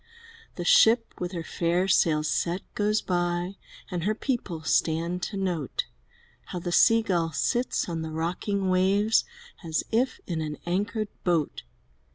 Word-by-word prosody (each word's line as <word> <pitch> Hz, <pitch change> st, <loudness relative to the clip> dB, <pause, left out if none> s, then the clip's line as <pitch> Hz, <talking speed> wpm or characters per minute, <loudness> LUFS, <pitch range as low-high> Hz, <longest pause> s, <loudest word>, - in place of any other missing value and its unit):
The 175 Hz, -, -5 dB
ship, 230 Hz, +5 st, +5 dB
with 180 Hz, 0 st, -3 dB
her 170 Hz, -2 st, -3 dB
fair 175 Hz, +3 st, 0 dB
sails 155 Hz, -5 st, +3 dB
set, 175 Hz, +4 st, 0 dB
goes 210 Hz, +1 st, +1 dB
by. 175 Hz, +1 st, -1 dB, 0.3 s
And 175 Hz, -2 st, -2 dB
her 215 Hz, +3 st, +1 dB
people 205 Hz, -, -3 dB
stand 165 Hz, +3 st, +1 dB
to 200 Hz, -, -4 dB
note 175 Hz, -8 st, -2 dB, 0.6 s
How -, -, -6 dB
the 175 Hz, 0 st, -3 dB
Sea 225 Hz, +5 st, +5 dB
gull 170 Hz, -5 st, 0 dB
sits 245 Hz, -, 0 dB
on 165 Hz, -2 st, -3 dB
the 160 Hz, -, -4 dB
rocking 185 Hz, +4 st, -1 dB
waves 195 Hz, +4 st, +3 dB, 0.4 s
As 160 Hz, -2 st, -1 dB
if 250 Hz, +3 st, +1 dB
in 165 Hz, -3 st, -3 dB
an 150 Hz, -1 st, -4 dB
anchored 205 Hz, +4 st, -1 dB
boat. 170 Hz, -5 st, 0 dB
180 Hz, 150 wpm, -27 LUFS, 170-205 Hz, 0.6 s, ship